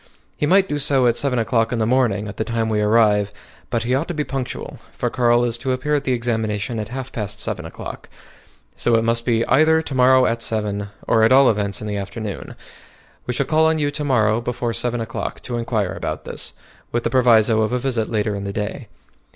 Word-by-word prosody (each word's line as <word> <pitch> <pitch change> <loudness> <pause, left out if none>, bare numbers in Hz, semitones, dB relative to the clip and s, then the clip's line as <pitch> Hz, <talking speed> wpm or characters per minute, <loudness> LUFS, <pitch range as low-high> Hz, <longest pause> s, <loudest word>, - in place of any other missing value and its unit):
He 145 - -1
might 190 +3 +4
do 145 -3 -2
so 135 -3 +2
at 120 -1 +3
seven 135 -2 0
o'clock 115 0 +1
in 120 - -1
the 110 - +1
morning, 110 -4 +1
at 100 - -8
the - - 0
time 115 0 -1
we 105 -1 +1
arrive; 105 -2 +3 0.4
but 115 -2 -1
he 125 +2 -1
ought 140 +5 0
to 175 - -4
be 150 - 0
punctual, 135 -3 -5
for - - -3
Carl 120 -1 +3
is 120 -1 0
to 130 +2 -1
appear 130 +4 -2
at 145 -1 0
the 130 - 0
examination 115 -2 -1
at 105 - -4
half 130 +3 -6
past 105 -1 -4
seven 95 -8 -3
o'clock. 85 - -9 0.7
So 120 - +1
it 115 - +2
must 115 0 0
be 115 -1 +2
either 155 +3 +4
to 145 - -6
morrow 130 0 +5
at 115 -1 0
seven, 105 -2 -1 0.2
or 115 - +3
at 110 - +4
all 135 -1 +7
events 100 -2 -2
in 105 - -5
the 105 -1 -2
afternoon. 100 +1 -6 0.7
We 125 - -2
shall 140 - 0
call 160 +2 +3
on 160 0 +2
you 145 -2 0
to 150 +1 -4
morrow 115 -5 +2
before 120 0 -2
seven 120 0 -1
o'clock 115 - -4
to 120 -2 -4
inquire 110 -5 -1
about - - -5
this, - - -4 0.4
with 120 0 -1
the - - -1
proviso 115 -3 +4
of 110 - 0
a 125 - +1
visit 120 -4 -1
later 105 -1 0
in 100 -1 -4
the 100 - -3
day. 105 0 -4
115 Hz, 230 wpm, -21 LUFS, 110-130 Hz, 0.7 s, all